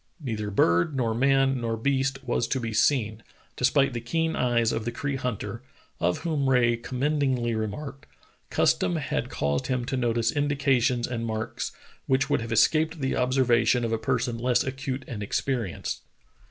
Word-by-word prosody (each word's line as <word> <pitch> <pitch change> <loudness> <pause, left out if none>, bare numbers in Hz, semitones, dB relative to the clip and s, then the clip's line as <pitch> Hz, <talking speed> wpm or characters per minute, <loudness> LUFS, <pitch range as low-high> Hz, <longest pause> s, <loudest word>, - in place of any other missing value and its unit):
Neither 110 -8 -3
bird 85 - +2
nor 120 -4 0
man 135 +1 +2
nor 115 -1 -1
beast 135 +2 0
was 120 -2 0
to 135 - -1
be 115 -2 -4
seen, 110 -2 +2 0.3
despite 135 +1 +2
the 120 - -3
keen 160 +7 -1
eyes 120 -2 +2
of 115 - -2
the 120 - -2
Cree 140 +3 -3
hunter, 125 -5 -4 0.4
of 90 +1 +1
whom 145 -5 +1
Rae 120 -2 +4
commendingly 130 0 0
remarked: 135 +6 -5 0.4
"Custom 90 -2 +2
had - - -2
caused 70 -1 -1
him 125 -2 -1
to 135 - -2
notice 115 -2 +1
indications 135 -4 +1
and 120 -2 -3
marks 110 -1 -3 0.4
which 135 0 +1
would - - +2
have 115 - -6
escaped 155 +8 +3
the 135 -1 -1
observation 125 -2 +2
of 115 - -2
a 115 - 0
person 120 0 -1
less 125 0 +2
acute 130 0 -4
and 105 -4 -6
experienced." 115 -2 -2
125 Hz, 165 wpm, -26 LUFS, 115-135 Hz, 0.4 s, Rae